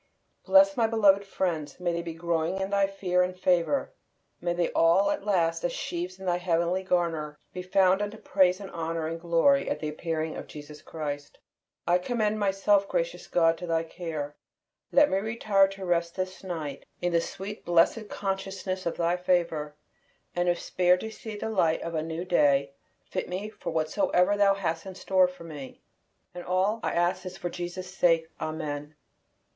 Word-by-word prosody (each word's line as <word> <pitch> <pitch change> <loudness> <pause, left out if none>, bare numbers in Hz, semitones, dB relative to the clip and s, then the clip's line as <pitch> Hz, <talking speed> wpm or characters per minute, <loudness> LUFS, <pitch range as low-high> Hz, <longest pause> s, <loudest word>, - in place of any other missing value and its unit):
Bless 295 0 +6
my 230 -3 +3
beloved 205 -3 +4
friends; 175 -6 -3
may 175 -1 0
they 170 - -1
be 165 -1 -6
growing 170 +2 -1
in 190 +1 -2
thy 200 -1 +3
fear 185 -2 0
and 180 0 -1
favor; 180 - +1 0.5
may 175 0 0
they 175 0 0
all 180 +5 +4
at 200 - -4
last, 165 -4 +1
as 175 - 0
sheaves 180 +2 -4
in 190 - -8
thy 175 -1 +1
heavenly 175 +1 0
garner, 165 -5 -1 0.2
be 180 - -4
found 185 +1 +3
unto 205 +1 -3
praise 185 -3 +2
and 195 -2 -8
honor 165 -1 -3
and 165 +1 -4
glory 175 +12 +3
at - - -2
the 155 - -3
appearing 160 0 -3
of - - -7
Jesus 150 0 -10
Christ. 145 -3 -6 0.5
I 175 +1 +4
commend 215 +1 0
myself, 200 0 +2
gracious - - -2
God, 165 -1 +3
to 175 - -6
Thy 165 -1 +1
care; 160 -3 -5 0.6
let 290 +1 +6
me 190 - +1
retire 210 -2 +2
to 195 0 -7
rest 170 -1 0
this 185 0 -4
night 160 -6 -5 0.2
in 175 -1 -1
the 195 +5 -2
blessed 175 +6 +2
consciousness 195 -2 -3
of 170 - -2
Thy 170 +1 +1
favor; 170 -5 0 0.6
and 175 0 +1
if 175 - +1
spared 180 0 +2
to 220 - -5
see 220 0 -8
the 220 +2 -4
light 165 -6 +2
of 170 - -5
a 155 - 0
new 165 +2 -4
day, 140 -5 +3 0.3
fit - - -4
me 190 +4 -4
for - - -7
whatsoever 180 - +2
Thou 200 -1 +4
hast 170 -2 -3
in 190 - -7
store 185 -1 +3
for 180 -1 -11
me. 150 -5 -9 0.5
And 175 0 -7
all 190 +5 +1
I - - -1
ask 175 +1 +1
is 185 0 -7
for 175 - -4
Jesus' 180 +1 -6
sake. 165 -3 +3 0.2
Amen. 150 -1 -4
180 Hz, 185 wpm, -28 LUFS, 165-195 Hz, 0.6 s, Bless